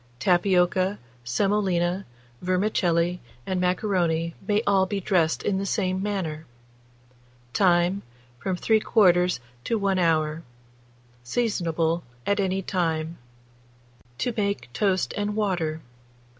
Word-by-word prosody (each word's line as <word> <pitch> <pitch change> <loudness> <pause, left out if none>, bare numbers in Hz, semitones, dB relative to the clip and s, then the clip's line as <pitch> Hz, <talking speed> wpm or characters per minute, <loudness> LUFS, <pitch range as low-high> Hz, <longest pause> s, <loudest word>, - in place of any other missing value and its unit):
Tapioca, 185 +4 +2 0.3
semolina, 185 +5 0 0.3
vermicelli, 180 -2 +1 0.3
and 185 -1 -1
macaroni, 175 -3 0
may 210 +1 +2
all 195 -1 +3
be 200 +1 -2
dressed 175 -4 +1
in 190 -2 0
the 195 - -2
same 185 -2 0
manner. 170 -7 -3 1.1
Time. 180 0 +3 0.4
From 185 +7 -2
3/4 180 -4 +3 0.3
to 230 - +1
1 195 -2 +1
hour. 160 -2 +1 0.8
Seasonable 170 - 0 0.2
at 200 +1 +1
any 190 0 0
time. 165 -3 -1 1.0
TO 240 - -1
MAKE 200 - -2
TOAST 190 +4 +1
AND 205 0 -2
WATER. 175 -7 -1
185 Hz, 100 wpm, -25 LUFS, 170-200 Hz, 1.1 s, all